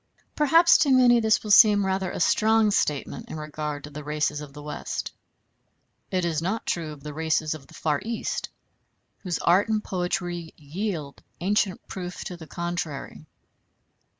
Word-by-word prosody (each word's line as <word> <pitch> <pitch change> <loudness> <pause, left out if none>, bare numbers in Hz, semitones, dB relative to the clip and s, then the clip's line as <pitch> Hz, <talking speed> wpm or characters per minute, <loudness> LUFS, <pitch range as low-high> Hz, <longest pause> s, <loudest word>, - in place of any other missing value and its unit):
Perhaps 330 +3 +5
to 295 - +3
many 250 -2 +6
this 220 -1 +2
will 210 - -3
seem 205 -1 +7
rather 190 -1 -1
a - - -5
strong 215 +4 +3
statement 150 -7 -1
in - - -6
regard 150 -1 -5
to 150 - -9
the 150 +1 -7
races 150 0 -1
of 145 -2 -9
the 145 +1 -11
West; 150 - -5 1.0
it 185 -2 0
is 160 -2 -1
not 195 +7 -2
true 165 -3 -2
of 145 -2 -12
the 150 -1 -6
races 160 0 0
of 140 -3 -11
the - - -16
Far 150 -3 -1
East, 230 +1 -3 0.7
whose 180 -4 -3
art 185 +6 +3
and 215 -1 0
poetry 175 -2 -3
yield 155 -1 -5 0.2
ancient 195 +1 0
proof 180 -1 -6
to 180 - -6
the 165 -2 -11
contrary. 165 -3 -5
175 Hz, 165 wpm, -25 LUFS, 150-205 Hz, 1.0 s, seem